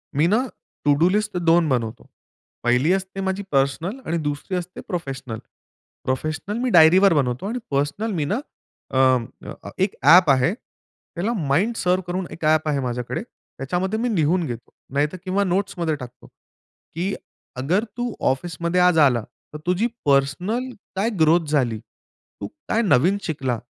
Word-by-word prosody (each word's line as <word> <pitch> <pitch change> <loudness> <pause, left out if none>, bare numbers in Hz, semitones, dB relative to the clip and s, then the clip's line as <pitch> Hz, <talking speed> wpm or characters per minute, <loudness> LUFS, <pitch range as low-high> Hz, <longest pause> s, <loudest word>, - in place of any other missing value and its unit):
मी 150 +3 +3
ना 215 +6 +3 0.5
to 145 - +5
do 170 - +6
list 210 -1 0
2 170 -1 +3
बनवतो. 115 -4 -2 0.5
पहिली 125 +7 +3
असते 195 0 -3
माझी 190 +1 -2
पर्सनल 145 - 0
आणि 170 - -1
दुसरी 145 +6 -3
असते 180 0 -6
प्रोफेशनल. 135 - -5 0.6
प्रोफेशनल 155 +10 -2
मी 255 - +1
डायरीवर 180 +1 +6
बनवतो 130 0 0
आणि 245 +4 -3
पर्सनल 145 +11 -1
मी 155 -5 -1
ना 205 - -1 0.5
अ, 130 -1 +5 0.6
एक 190 +1 +1
ॲप 165 +3 +7
आहे 135 +7 +4
त्याला 215 -3 -8 0.2
MindServ 185 +2 +1
करून 180 +1 -2
एक 160 - -10
ॲप 155 0 +3
आहे 145 -2 +1
माझ्याकडे, 125 -2 -3
त्याच्यामध्ये 180 +10 -4
मी 240 -1 0
लिहून 165 +2 +2
घेतो. 120 -4 -7 0.2
नाहीतर 150 +5 0
किंवा 195 +2 +1
नोट्समध्ये 180 -3 -1
टाकतो. 125 -3 -11
की 180 +5 -8 0.4
अगर 165 - +1
तू 245 -1 -2 0.2
ऑफिसमध्ये 170 +4 -1
आज 180 -2 +4
आला, 120 -4 +2 0.3
तर - - -5
तुझी 180 +6 +1 0.2
पर्सनल 160 - +1 0.3
काय 205 +5 +1
ग्रोथ 160 +2 +4
झाली? 125 -7 +1
तू 115 +1 -14 0.2
काय 230 - +1
नवीन 180 - +3
शिकला? 135 -8 -2
170 Hz, 145 wpm, -22 LUFS, 140-190 Hz, 0.6 s, ॲप